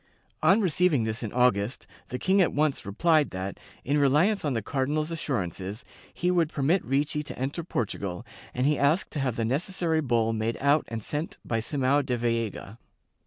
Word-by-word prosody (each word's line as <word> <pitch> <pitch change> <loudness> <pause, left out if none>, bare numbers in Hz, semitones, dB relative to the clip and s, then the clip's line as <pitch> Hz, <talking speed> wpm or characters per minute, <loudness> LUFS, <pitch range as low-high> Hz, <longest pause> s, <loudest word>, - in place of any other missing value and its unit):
On 190 +8 +5
receiving 175 - +2
this 110 +1 -2
in 110 -4 -4
August, 120 -2 +1 0.2
the 125 - -4
king 190 +7 +3
at 175 - +3
once 150 -7 0
replied 155 - +3
that, 95 +1 -5 0.3
in 145 +3 +2
reliance 155 +10 +3
on 145 -3 0
the 115 - -1
cardinal's 145 +6 -1
assur 155 -4 -2
ances, 95 +5 -7 0.3
he 180 +1 0
would 170 -3 +2
permit 155 +5 +1
Ricci 145 +3 0
to 150 - -8
enter 140 +6 -3
Portugal 100 - -3 0.3
and 125 - -1
he 150 0 +2
asked 150 +6 +2
to 150 - -3
have 130 -4 -1
the 115 - -1
necessary 160 - 0
bull 115 -5 +1
made 110 +1 -1
out 140 +2 +3
and 115 -2 -5
sent 150 +7 -3
by 115 - -1
Simao 140 +4 +1
da 125 -2 -1
Veiga. 115 -2 -2
140 Hz, 185 wpm, -27 LUFS, 115-155 Hz, 0.3 s, On